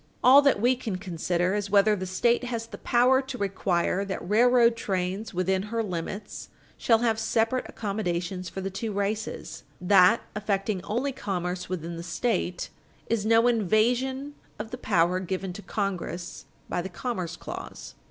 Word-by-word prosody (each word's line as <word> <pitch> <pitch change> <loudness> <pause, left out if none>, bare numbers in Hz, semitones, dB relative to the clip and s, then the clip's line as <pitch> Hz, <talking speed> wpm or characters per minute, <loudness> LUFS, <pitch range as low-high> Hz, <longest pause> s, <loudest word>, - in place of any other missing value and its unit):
All 265 +3 +9
that 280 -6 +3
we 245 +4 +3
can 230 -6 -4
consider 180 -1 -1
is 205 -1 -2
whether 205 +1 +4
the 185 -1 -5
State 235 +7 +1
has 230 -2 -3
the 230 - -10
power 250 +2 +4
to 265 -1 -7
require 195 -2 0
that 190 -3 -5
railroad 235 +2 +5
trains 195 0 -2
within 185 +1 0
her 230 0 -1
limits 195 +2 -5 0.3
shall 230 - +3
have 220 -1 +1
separate 225 +3 0
accommodations 185 -3 -3
for 190 - -6
the 195 +1 -3
two 215 +3 -4
races; 205 +2 -3 0.2
that 185 +4 +5
affecting 200 -2 -1
only 250 +6 -1
commerce 180 -8 -3
within 170 -2 -4
the - - -5
State 180 +1 -2 0.4
is 215 -2 +1
no 230 +1 +5
invasion 245 +6 +1 0.2
of 220 +1 -6
the 250 - -5
power 175 -3 +2
given 185 0 -4
to 205 - -8
Congress 185 -4 -4 0.2
by 175 - -1
the 190 - -6
commerce 180 -3 -4
clause." - - -8
200 Hz, 160 wpm, -27 LUFS, 185-230 Hz, 0.4 s, All